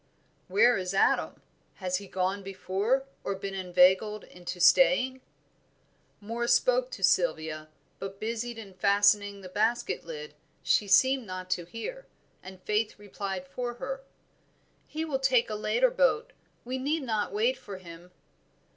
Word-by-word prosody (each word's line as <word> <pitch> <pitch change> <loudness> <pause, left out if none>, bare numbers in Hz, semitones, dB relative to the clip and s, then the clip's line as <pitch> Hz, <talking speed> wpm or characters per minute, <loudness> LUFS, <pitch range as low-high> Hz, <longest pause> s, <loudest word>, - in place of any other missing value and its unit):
"Where 245 - +4
is 185 +1 -3
Adam? - - +1 0.3
Has 185 -2 -2
he 200 +1 -9
gone 190 +2 -1
before, 195 +7 -1 0.2
or 195 - -2
been 195 0 -5
inveigled 190 +3 +3
into 180 0 -8
staying?" 260 +7 +4 1.0
Moor 230 +3 -3
spoke - - +3
to - - -7
Sylvia, 155 - +1 0.3
but 195 0 -7
busied 230 +1 -3
in 205 -4 -10
fastening 205 +1 +3
the 185 - -9
basket 220 +6 0
lid, 470 -1 -8 0.3
she 210 - +2
seemed 260 +4 +4
not 185 0 -6
to 175 -2 0
hear, 365 - -7 0.3
and 185 0 -12
Faith 215 +1 0
replied 195 -2 -6
for 240 +6 -4
her. 270 +2 -5 0.9
"He 315 +1 -4
will 280 -4 -2
take 255 -4 +2
a - - -2
later 485 - +2
boat, - - +1 0.3
we 255 +2 -3
need 295 +3 -1
not 220 -4 -1
wait 460 +4 +1
for 200 -2 -9
him." 175 -1 -12
210 Hz, 145 wpm, -28 LUFS, 190-260 Hz, 1.0 s, Where